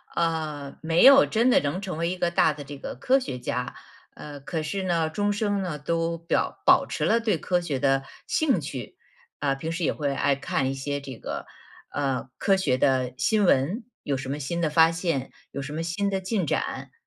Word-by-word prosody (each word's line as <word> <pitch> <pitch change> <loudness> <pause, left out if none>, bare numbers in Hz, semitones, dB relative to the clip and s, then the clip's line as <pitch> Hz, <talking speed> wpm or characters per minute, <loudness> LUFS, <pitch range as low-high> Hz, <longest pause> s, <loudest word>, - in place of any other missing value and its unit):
呃， 155 -4 -2
没 165 +1 +3
有 275 +1 +9
真 235 +3 +2
的 - - +6
能 145 +6 -2
成 190 -5 -5
为 170 +1 0
一 185 - -3
个 175 -1 0
大 160 -2 +3
的 145 0 -8
这 140 0 -9
个 - - -6
科 265 - +3
学 130 - -5
家， 125 0 -3 0.4
呃， 145 -1 -9
可 160 +3 -4
是 190 +6 -3
呢， 170 -3 +1
终 205 +5 0
生 205 -1 0
呢 170 -6 -4
都 165 +2 -1
表 165 +1 -1
保 - - +6
持 - - -4
了 230 - +3
对 225 -2 +1
科 180 -1 0
学 150 -6 -2
的 135 0 +2 0.2
兴 270 - +2
趣。 135 -6 -7 0.4
啊， 140 -2 +1
平 160 +4 -4
时 170 +1 -3
也 - - +2
会 145 -2 -2
爱 140 0 +2
看 135 -1 -1
一 - - -1
些 140 +1 -3
这 135 -2 -8
个， - - -6 0.4
呃， 135 -2 -2
科 195 - +3
学 150 -10 +1
的 130 -2 +1
新 205 +11 +2
闻， 175 - +2 0.2
有 140 - -1
什 130 0 -5
么 140 - -2
新 160 +4 -3
的 160 - +2
发 160 +2 +5
现， 165 -6 -2 0.2
有 140 - -5
什 145 +2 -6
么 160 - -2
新 195 +5 -1
的 190 -1 -1
进 190 -1 -1
展， - - -2
160 Hz, 230 characters per minute, -26 LUFS, 140-185 Hz, 0.4 s, 有